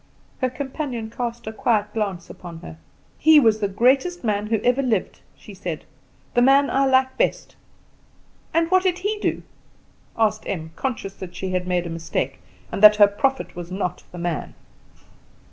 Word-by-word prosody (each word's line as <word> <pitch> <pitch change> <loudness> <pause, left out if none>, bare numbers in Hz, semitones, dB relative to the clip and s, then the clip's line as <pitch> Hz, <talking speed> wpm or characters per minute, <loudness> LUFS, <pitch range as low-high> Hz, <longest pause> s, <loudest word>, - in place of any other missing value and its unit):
Her 255 - +1
companion 260 -4 -5
cast 235 0 -4
a 220 - -5
quiet 215 -2 0
glance 195 -6 -3
upon 170 -2 -10
her. 80 - -10 0.4
"He 310 0 +7
was 225 -5 +3
the 205 - 0
greatest 260 - +2
man 210 -2 0
who 220 0 +1
ever 250 +2 +3
lived," 230 -8 -1 0.2
she 205 - -13
said, 180 -5 -6 0.5
"the 245 - +3
man 275 +2 +5
I 275 0 +3
like 260 - +2
best." - - 0 1.0
"And 330 +1 +1
what 370 0 +5
did 365 -2 +1
he 410 +3 -2
do?" - - -1 0.7
asked 215 -1 +1
Em, 160 -4 -4
conscious 215 -2 -3
that 185 -2 -9
she 190 -1 -4
had 180 0 -1
made 180 -1 0
a - - -4
mistake, 165 -5 -3 0.3
and - - -4
that 210 0 +10
her 210 -1 +8
prophet 265 +7 -1
was 175 0 -7
not 180 -2 -3
the 180 - -9
man. 170 -2 -3
220 Hz, 175 wpm, -23 LUFS, 185-265 Hz, 1.0 s, that